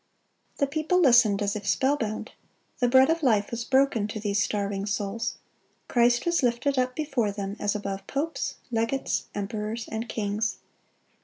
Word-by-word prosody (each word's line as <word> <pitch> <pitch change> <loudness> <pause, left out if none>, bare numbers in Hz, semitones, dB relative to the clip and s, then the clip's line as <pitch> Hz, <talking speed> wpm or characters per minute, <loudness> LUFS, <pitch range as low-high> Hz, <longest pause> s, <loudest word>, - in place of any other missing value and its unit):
(208) - - -22
The 280 -1 0
people 315 +4 +2
listened 240 - +5
as 200 0 -1
if 205 -1 -5
spellbound. 230 -4 0 0.5
The 245 - +3
bread 260 +4 +6
of 330 0 0
life 220 -7 +2
was 235 0 -3
broken 265 -5 +2
to 215 +1 -5
those 205 -1 0
starving 200 -1 -1
souls. 210 +2 -2 0.5
Christ 240 0 +3
was 345 -2 +2
lifted 255 +2 +1
up 250 0 0
before 270 -9 0
them 200 0 -5
as 205 +1 0
above 200 -1 -4
popes, 300 +4 -2 0.2
legates, 230 +4 -1
emperors, 210 +2 -4
and 225 +1 -4
kings. 215 0 -1
230 Hz, 160 wpm, -26 LUFS, 205-265 Hz, 0.5 s, bread